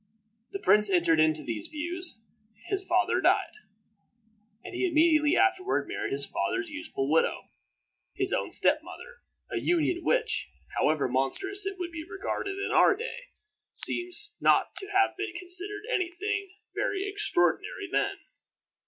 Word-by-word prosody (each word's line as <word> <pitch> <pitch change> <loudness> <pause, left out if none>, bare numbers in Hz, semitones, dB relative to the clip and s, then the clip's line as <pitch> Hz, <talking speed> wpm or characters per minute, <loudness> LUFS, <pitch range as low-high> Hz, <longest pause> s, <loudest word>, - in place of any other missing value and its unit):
The 395 - -4
prince 210 - +4
entered 170 -4 +3
into 155 -1 +2
these 115 -5 -5
views; 340 -4 -5 0.5
his 395 -1 0
father 360 0 +1
died, 380 0 +2 1.1
and - - -9
he 375 - 0
immediately 310 -1 +3
afterward 380 0 +1
married 400 0 -4
his 405 - +1
father's 370 -3 -3
youthful 300 - -4
widow 160 +3 +1 0.7
his - - 0
own - - -1
step - - +5
mother - - -12 0.3
a - - -1
union 345 0 0
which, - - +1 0.3
however 155 -2 +1
monstrous 385 - 0
it 395 -1 -4
would 355 -2 -5
be 325 -2 -6
regarded 390 +1 -4
in 395 - -3
our - - +5
day, 480 +3 -7 0.5
seems 355 0 +1
not - - +3
to 390 - -1
have 390 -1 +2
been 400 -2 -4
considered 365 +4 -1
any 375 -8 0
thing 400 +3 -3 0.2
very 390 0 -2
extraordinary 405 -1 0
then. - - 0
360 Hz, 145 wpm, -28 LUFS, 310-395 Hz, 1.1 s, step